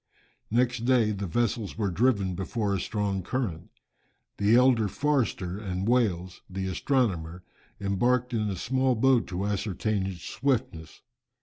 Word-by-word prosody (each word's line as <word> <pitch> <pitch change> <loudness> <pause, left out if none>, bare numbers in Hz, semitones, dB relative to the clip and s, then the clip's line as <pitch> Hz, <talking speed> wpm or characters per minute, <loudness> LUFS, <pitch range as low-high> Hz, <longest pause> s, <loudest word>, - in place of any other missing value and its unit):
Next 125 +2 +1
day 120 -4 +3
the 100 -1 -3
vessels 110 +2 -1
were 100 -4 0
driven 100 -2 +2
before 100 +3 -2
a 100 - 0
strong 100 -2 -2
current. 95 -5 -3 0.7
The 105 +3 +4
elder 125 -3 +4
Forster 110 -8 -1
and 95 -1 -3
Wales, 95 -8 +1
the 95 0 -4
astronomer, 95 - -1 0.4
embarked 120 +6 +1
in 105 -2 0
a 95 - -2
small 130 +6 +1
boat 125 +1 +3
to 95 +1 -3
ascertain 105 0 -1
its 90 -3 -7
swiftness. 110 - -2
105 Hz, 135 wpm, -27 LUFS, 95-125 Hz, 0.7 s, The